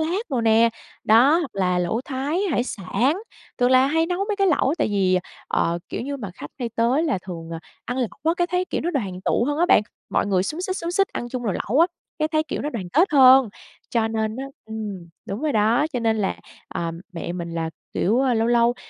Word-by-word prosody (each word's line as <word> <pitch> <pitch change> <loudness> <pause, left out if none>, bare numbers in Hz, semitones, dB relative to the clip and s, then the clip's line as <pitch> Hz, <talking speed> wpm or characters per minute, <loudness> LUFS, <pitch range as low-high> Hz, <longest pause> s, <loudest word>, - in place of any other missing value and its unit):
lác 345 +6 -2
đồ 255 -4 0
nè, 225 +1 +5 0.4
đó, 255 +9 +6
hoặc 325 -7 -3
là 180 -2 +1
lẩu 180 +6 0
Thái, 280 +5 -2
hải 245 -4 +1
sản, 255 - -1 0.4
thường 245 +1 +3
là 260 +1 +6
hay 325 +3 +2
nấu 355 +1 -2
mấy 420 - 0
cái 395 -1 +2
lẩu 300 -4 +2
tại - - +1
vì, 190 -3 +2 0.3
ờ, 170 +1 +1
kiểu - - -4
như 280 +3 -4
mà, 210 -8 -6
khách 145 - -9
hay 240 -3 -2
tới 240 +6 +2
là 275 - 0
thường 165 -2 -7 0.3
ăn 245 +2 -3
lẩu 245 - 0 0.2
á 325 +1 +3
cái 350 -1 +1
thấy, 360 0 0
kiểu, - - -3
nó 345 - -1
đoàn 195 - -3
tụ - - +2
hơn 290 +3 -1
á 345 - +3
bạn, 210 - +5 0.3
mọi - - +1
người 185 -2 +2
xúm 310 - -4
xít 375 +1 -2
xúm 335 +1 -3
xít 390 +2 +2
ăn 240 - -5
chung 250 0 -4
nồi 205 -6 -1
lẩu 260 +7 +2
á, 335 - +7 0.3
cái 310 - +1
thấy, 310 -1 +1
kiểu, 310 - -4
nó 295 - -2
đoàn 195 -7 -5
kết 345 +7 +4
hơn. 260 -3 +7 0.4
Cho 225 -2 +1
nên 220 0 -2
á 265 - -4 0.2
ừm, 210 -5 -6 0.2
đúng 200 +5 -4
rồi 305 - +1
đó, 225 +6 +3
cho 245 - -1
nên 225 -1 +2
là, 200 -3 -1 0.3
à, 170 -1 -3 0.2
mẹ 170 0 -5
mình 170 -1 -5
là, 165 -1 -3 0.2
kiểu, 220 +7 +2
ơ, 260 -3 +2
lâu 225 +1 +1
lâu, 240 0 +4
240 Hz, 240 wpm, -23 LUFS, 205-300 Hz, 0.4 s, á